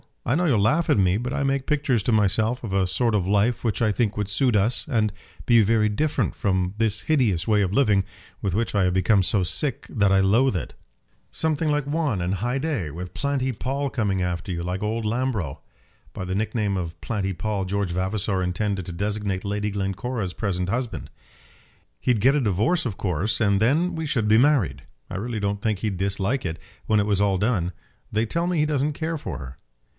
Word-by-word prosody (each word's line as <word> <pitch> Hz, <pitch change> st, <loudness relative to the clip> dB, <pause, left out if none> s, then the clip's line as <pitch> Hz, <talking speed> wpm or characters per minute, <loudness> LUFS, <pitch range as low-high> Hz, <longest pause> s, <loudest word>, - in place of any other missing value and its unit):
I 120 Hz, -, +1 dB
know 175 Hz, +3 st, +1 dB
you'll 130 Hz, -10 st, +3 dB
laugh 150 Hz, +12 st, +2 dB
at -, -, +4 dB
me; 95 Hz, -1 st, +3 dB
but 125 Hz, +3 st, -3 dB
I 140 Hz, -, 0 dB
make 135 Hz, -1 st, 0 dB
pictures 140 Hz, -6 st, +1 dB
to 120 Hz, -, +1 dB
myself 110 Hz, +3 st, +2 dB
of 105 Hz, -5 st, -4 dB
a 95 Hz, -1 st, +2 dB
sort 115 Hz, +4 st, +1 dB
of 95 Hz, -3 st, 0 dB
life 105 Hz, +4 st, +2 dB
which 115 Hz, -1 st, -1 dB
I 110 Hz, -, +3 dB
think 105 Hz, 0 st, 0 dB
would 105 Hz, -1 st, -2 dB
suit 125 Hz, +2 st, +2 dB
us, 105 Hz, +2 st, +2 dB
and 110 Hz, -7 st, +1 dB, 0.3 s
be 115 Hz, -2 st, +6 dB
very 110 Hz, 0 st, +3 dB
different 150 Hz, +9 st, 0 dB
from 95 Hz, -2 st, 0 dB
this 110 Hz, -2 st, +1 dB
hideous 115 Hz, -, +1 dB
way 105 Hz, -2 st, +3 dB
of 95 Hz, -1 st, 0 dB
living, 105 Hz, -6 st, +3 dB, 0.4 s
with 95 Hz, -3 st, -1 dB
which 115 Hz, +2 st, 0 dB
I 100 Hz, -2 st, +2 dB
have 90 Hz, -, +1 dB
become 95 Hz, +2 st, +3 dB
so 95 Hz, +1 st, +2 dB
sick 130 Hz, -, -1 dB
that 100 Hz, -3 st, +2 dB
I 95 Hz, -, +5 dB
loathe 110 Hz, +5 st, +3 dB
it." 90 Hz, -, -4 dB, 0.6 s
"Something 160 Hz, -1 st, 0 dB
like 150 Hz, -1 st, +1 dB
Juan 145 Hz, -, -1 dB
and 90 Hz, +3 st, 0 dB
Haidée, 120 Hz, -, -2 dB
with 90 Hz, +4 st, -7 dB
Planty 140 Hz, -2 st, -1 dB
Pall 135 Hz, +4 st, -2 dB
coming 100 Hz, -7 st, -1 dB
after 90 Hz, +1 st, -2 dB
you, 85 Hz, -1 st, -3 dB
like 90 Hz, +2 st, -3 dB
old 110 Hz, +1 st, -2 dB
Lambro." 110 Hz, -, -1 dB, 0.5 s
By -, -, -5 dB
the 95 Hz, +1 st, -3 dB
nickname 105 Hz, -1 st, -1 dB
of 85 Hz, -2 st, -5 dB
Planty 100 Hz, -4 st, -2 dB
Pall 100 Hz, +1 st, -2 dB
George 100 Hz, -1 st, -1 dB
Vavasor 95 Hz, +2 st, -1 dB
intended 95 Hz, +1 st, -1 dB
to -, -, -4 dB
designate 100 Hz, +1 st, -2 dB
Lady 105 Hz, +1 st, -1 dB
Glencora's 100 Hz, +1 st, -3 dB
present 90 Hz, -4 st, -2 dB
husband. 120 Hz, +2 st, -3 dB, 0.9 s
"He'd 120 Hz, -5 st, +1 dB
get 135 Hz, +5 st, +5 dB
a 145 Hz, -, +2 dB
divorce, 110 Hz, -, +1 dB
of 110 Hz, -6 st, -2 dB
course, 95 Hz, +3 st, -1 dB
and 100 Hz, -2 st, +3 dB
then 160 Hz, -, +2 dB
we 160 Hz, 0 st, -3 dB
should 115 Hz, -7 st, 0 dB
be 110 Hz, +1 st, +5 dB
married. 115 Hz, -, +2 dB, 0.3 s
I 95 Hz, -, -4 dB
really 115 Hz, +2 st, -3 dB
don't 100 Hz, 0 st, -2 dB
think 105 Hz, -3 st, 0 dB
he'd 100 Hz, -3 st, -2 dB
dislike 100 Hz, +6 st, -1 dB
it, 85 Hz, -1 st, -3 dB, 0.3 s
when 110 Hz, -1 st, +3 dB
it 100 Hz, -, +2 dB
was 100 Hz, -2 st, +2 dB
all 100 Hz, -2 st, +2 dB
done. 95 Hz, -4 st, 0 dB, 0.4 s
They 110 Hz, +2 st, +1 dB
tell 170 Hz, +9 st, -1 dB
me 180 Hz, -3 st, 0 dB
he 150 Hz, -, +3 dB
doesn't 150 Hz, 0 st, 0 dB
care 160 Hz, +2 st, -3 dB
for 95 Hz, -, -5 dB
her." 65 Hz, -2 st, -9 dB
105 Hz, 210 wpm, -24 LUFS, 95-125 Hz, 0.9 s, be